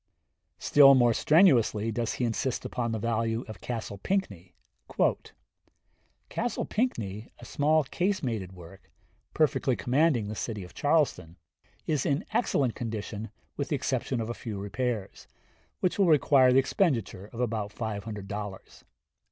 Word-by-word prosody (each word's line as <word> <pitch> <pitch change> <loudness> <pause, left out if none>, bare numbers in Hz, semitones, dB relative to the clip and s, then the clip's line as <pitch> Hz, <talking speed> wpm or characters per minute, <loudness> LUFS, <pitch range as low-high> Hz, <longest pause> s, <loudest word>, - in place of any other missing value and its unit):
Still 140 -1 +6
more 120 -2 +4
strenuously 120 - +4
does 115 +1 -2
he 125 - -1
insist 120 +2 -2
upon 120 -2 -2
the 110 - -1
value 115 +1 -1
of 110 - -10
Castle 110 -4 -5
Pinckney. 100 - -3 1.7
"Castle 240 +1 -2
Pinckney, 110 - -2
a - - -12
small 155 +2 +2
casemated 130 - -2
work, 90 +1 -14 0.5
perfectly 135 -4 +2
commanding 130 -3 +1
the 105 - -4
city 105 -2 -4
of 90 - -12
Charleston, 130 - 0 0.5
is 150 -4 0
in 145 +8 0
excellent 135 - +1
condition 110 -1 -5 0.3
with - - -3
the - - +1
exception 130 - -2
of 110 - -3
a - - -3
few 110 -3 -6
repairs, 105 0 -4 0.5
which 185 +2 0
will 195 - +4
require 140 -4 +5
the 130 - +4
expenditure 130 - 0
of 115 - -9
about 110 -4 -2
five 110 -3 -4
hundred 105 -3 -6
dollars.... 100 -1 -7
115 Hz, 140 wpm, -28 LUFS, 105-140 Hz, 1.7 s, Still